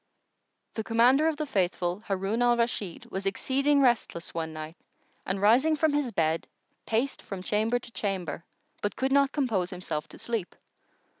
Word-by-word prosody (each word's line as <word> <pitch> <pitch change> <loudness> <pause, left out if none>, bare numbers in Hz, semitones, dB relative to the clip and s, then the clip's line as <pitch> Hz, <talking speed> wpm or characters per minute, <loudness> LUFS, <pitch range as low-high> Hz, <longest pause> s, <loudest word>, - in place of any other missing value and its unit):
The 220 - -3
Commander 245 +7 +4
of 320 -2 0
the 305 - -2
Faithful 180 -5 0
Harun 200 +2 -1
Al 240 0 +4
Rashid 220 -6 -2
was 195 +1 -3
exceeding 275 +7 +2
restless 235 -9 +1
one 160 -1 -3
night 155 +1 -7 0.5
and 190 +1 -1
rising 245 +10 +5
from 310 0 +2
his 290 -4 0
bed, 160 -4 0 0.4
paced 235 +5 0
from 190 -2 -7
chamber 215 +4 +1
to 240 -1 -9
chamber, 185 -8 -3 0.4
but 205 - -2
could 265 +1 0
not 280 0 +4
compose 225 - 0
himself 175 -5 -4
to - - -13
sleep. 225 -6 -3
220 Hz, 160 wpm, -28 LUFS, 185-260 Hz, 0.5 s, rising